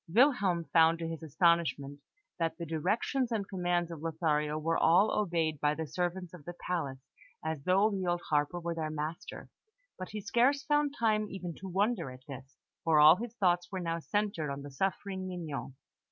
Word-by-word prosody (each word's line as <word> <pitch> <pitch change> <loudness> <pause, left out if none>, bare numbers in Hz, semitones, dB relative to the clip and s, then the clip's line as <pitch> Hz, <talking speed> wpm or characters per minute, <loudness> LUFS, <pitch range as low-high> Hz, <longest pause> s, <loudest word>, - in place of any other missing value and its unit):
Wilhelm 205 - +3
found 165 0 +6
to 165 0 -4
his 165 -1 -5
astonishment 155 -3 +1 0.4
that 165 -1 -1
the 170 - -5
directions 205 - 0
and 210 -4 -1
commands 175 -2 -1
of 160 -3 -7
Lothario 155 -2 0
were 165 +2 0
all 180 +6 +5
obeyed 165 -6 0
by 150 +1 +1
the 160 - -3
servants 180 +3 -3
of 175 -5 -11
the 175 +3 -7
palace 140 -7 -3 0.4
as 160 -3 -3
though 195 +4 +4
the 190 -2 -2
old 175 0 0
harper 150 +4 +1
were 170 0 -3
their 160 -2 -3
master, 155 +1 -5 0.5
but 185 - -6
he 215 - -5
scarce 245 +7 +2
found 295 0 +1
time 215 -2 +1
even 180 -3 -6
to 190 - -9
wonder 195 - 0
at 130 +1 -12
this, 135 -1 -10 0.3
for 160 -2 +4
all 155 +3 +8
his 235 +2 -6
thoughts 175 -4 +1
were 190 - -3
now 165 -1 -2
centred 200 -4 -1
on 140 0 -5
the 145 - -8
suffering 190 +4 -2
Mignon. 160 -7 -5
170 Hz, 185 wpm, -31 LUFS, 155-195 Hz, 0.5 s, all